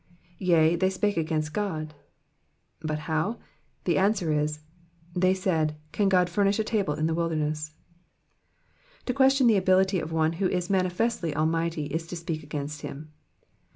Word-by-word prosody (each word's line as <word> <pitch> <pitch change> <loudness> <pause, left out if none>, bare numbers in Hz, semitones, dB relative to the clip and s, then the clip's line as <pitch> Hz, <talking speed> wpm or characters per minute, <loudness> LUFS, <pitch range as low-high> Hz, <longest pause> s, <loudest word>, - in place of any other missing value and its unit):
Yea^ 170 -2 +4
they 190 0 +3
spake 205 +2 0
against 155 -2 -1
Ood,'''* 160 -7 -2 0.9
But 155 -1 -2
how? 160 +9 -1 0.5
The 175 - +2
answer 190 -5 +2
is, 150 0 0 0.3
*' 170 +1 -28
They 185 +1 +4
said. 160 -5 0 0.2
Can 200 +3 +2
Ood 180 -1 +4
furnish 200 +3 +1
a 220 - +1
table 205 -9 0
in 155 - -1
the 165 - +1
wilderness 155 -2 -1
V 155 - -26 1.3
To 250 - -1
question 270 0 +4
the 225 -3 +5
ability 190 0 +3
of 160 0 -5
one 160 0 +1
who 190 - +3
is 180 +1 -1
mam 185 -1 +3
festly 180 -3 -1
Almighty, 165 0 0
is 160 +3 -4
to 175 - -6
speak 165 -3 -5
ajjainst 145 0 -4
him. 150 +2 -8
170 Hz, 165 wpm, -27 LUFS, 155-190 Hz, 1.3 s, the